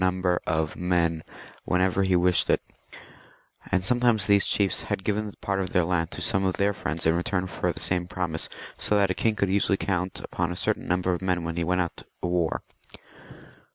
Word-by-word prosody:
^ - - +1
■ - - +5
■ - - -2
number 90 -1 0
of 80 -1 0
men 85 -3 0 0.4
whenever 90 +1 +1
he 95 -1 +2
wished 90 0 +3
it, - - +4 1.1
and 90 0 +1
sometimes 120 -3 +3
these 100 -2 +4
chiefs 100 -3 +2
had 95 - -2
given 105 +1 -1
part 100 -1 -1
of 95 -2 -3
their 90 - +4
land 85 -2 0
to 85 - -7
some 95 +1 +2
of 95 -1 0
their 100 +1 +2
friends 85 -5 -4
in 80 +1 +4
return 90 +2 -1
for 95 - -2
the - - -8
same 90 -1 -1
promise, 85 -3 -2 0.3
so 105 - +1
that 100 -2 +3
a - - +1
king 110 +3 +1
could 100 -1 +1
usually 100 0 +2
count 95 -2 -2
upon 85 0 -2
a - - -4
certain - - -1
number 90 +1 +1
of 85 - -3
men 90 -2 0
when 85 0 -3
he 85 - -1
went 90 0 0
to - - -11 0.2
war. 85 -2 0
90 Hz, 215 wpm, -26 LUFS, 85-95 Hz, 1.1 s, ■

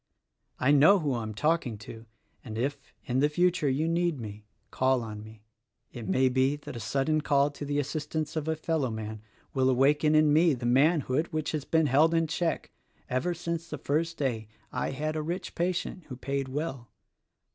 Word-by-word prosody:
I 130 +3 +3
know 150 +8 +7
who 150 -7 -1
I 120 - -2
am 110 -1 -5
talking 150 -3 0
to; 115 +2 -11 0.4
and 110 -2 -7
if, 135 +5 -1 0.3
in 125 +1 0
the 145 +2 +3
future, 175 -1 +2
you 145 +5 0
need 170 -3 0
me, 105 -1 -8 0.2
call 130 -1 +2
on 105 -2 -7
me. 110 0 -13 0.5
It 115 -4 -7
may 130 +8 +3
be 130 +2 +2
that 145 - -9
a - - -5
sudden 140 +7 0
call 145 -1 +2
to 145 0 -7
the 145 0 -1
assistance 150 +2 -2
of 155 -1 -2
a 160 - +1
fellowman 115 -10 -2 0.3
will 130 -1 +2
awaken 145 +4 +3
in 155 -1 +5
me 160 -1 +4
the 120 -1 -6
manhood 140 +3 +3
which 155 -2 -2
has 150 -3 -3
been 160 -1 +2
held 150 +5 +4
in 165 0 +3
check 165 +1 -2 0.4
ever 170 +8 0
since 170 0 -4
the 155 - -4
first 165 +5 -1
day 115 -6 -2 0.2
I - - -2
had 155 +3 -3
a 155 - -1
rich 170 +5 -4
patient 180 0 -2
who 130 - -8
paid 135 +1 -3
well. 135 -3 -4
145 Hz, 190 wpm, -28 LUFS, 130-160 Hz, 0.5 s, know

